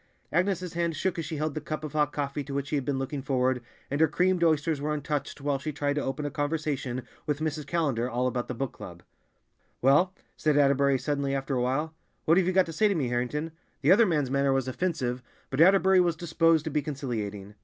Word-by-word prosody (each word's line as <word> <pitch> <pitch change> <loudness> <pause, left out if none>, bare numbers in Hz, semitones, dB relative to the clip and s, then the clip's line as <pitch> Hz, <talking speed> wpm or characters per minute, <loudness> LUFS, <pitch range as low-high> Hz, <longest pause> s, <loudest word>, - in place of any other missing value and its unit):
Agnes's 180 0 0
hand 170 -1 -1
shook 180 +2 -1
as 165 - -3
she 160 - -4
held 155 0 -1
the 155 - -4
cup 155 +1 -5
of 150 - -6
hot 150 -2 +2
coffee 145 0 -3
to 140 0 -6
which 140 0 -2
she - - 0
had 140 - 0
been 140 -2 -1
looking 135 +1 -3
forward, 130 -2 +1 0.3
and 145 +2 0
her 160 - +6
creamed 180 +3 +1
oysters 155 -2 +2
were 150 +1 -1
untouched 145 -1 -3
while 140 -1 0
she 155 +3 -4
tried 145 0 -1
to 145 - -1
open 140 +2 -3
a 145 - -2
conversation 145 -4 -2 0.2
with 150 -1 0
Mrs. 155 -2 -3
Callender 140 -8 0
all 125 +1 -1
about 125 -1 -1
the 125 - -4
Book 135 +1 -3
Club. - - -10 0.8
"Well," 150 +9 +4 0.2
said 150 -2 +1
Atterbury 140 -1 +4
suddenly 140 0 -1
after 135 +1 -2
a 125 - +1
while, 140 +6 -1 0.3
"what 165 +2 +5
have 180 - +1
you - - +3
got 185 0 +4
to 165 - -7
say 215 +7 +3
to 200 - +1
me, 135 -7 0
Harrington?" 125 +6 -2 0.3
The - - +5
other 215 +3 +6
man's 150 -7 0
manner 140 0 +2
was 135 -1 +1
offensive, 130 -3 -2 0.3
but 135 +3 +1
Atterbury 190 +1 +6
was 170 -2 +1
disposed 165 -1 +2
to 160 - -3
be 150 - +1
conciliating. 110 -9 -4
145 Hz, 230 wpm, -28 LUFS, 135-160 Hz, 0.8 s, her